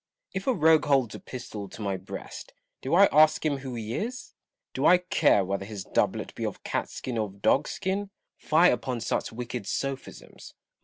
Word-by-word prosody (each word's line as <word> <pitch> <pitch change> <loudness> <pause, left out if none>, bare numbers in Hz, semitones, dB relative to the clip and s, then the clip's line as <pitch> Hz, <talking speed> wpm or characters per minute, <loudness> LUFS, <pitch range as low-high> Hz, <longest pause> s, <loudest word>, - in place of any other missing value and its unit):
If 190 +4 -4
a 260 - +4
rogue 160 -2 +4
holds 135 -6 +2
a - - -7
pistol 110 -6 -7
to - - -12
my 100 -1 -1
breast, 95 +1 -8 0.3
do 135 - 0
I 200 +3 +8
ask 155 +1 +5
him 145 -2 +1
who 135 -2 -6
he 110 -1 -4
is? 245 - -4 0.4
Do - - +2
I 180 - +7
care 160 - +2
whether 100 +1 -2
his 100 -1 -7
doublet - - -1
be - - -6
of - - -4
cat - - -2
skin 125 -3 -4
or 110 - 0
of 100 0 -17
dog 140 +3 +3
skin? 195 +2 -2 0.3
Fie 165 +3 +4
upon 125 0 -2
such - - -2
wicked 120 -2 -5
sophisms 135 +3 -5
130 Hz, 195 wpm, -27 LUFS, 110-160 Hz, 0.4 s, I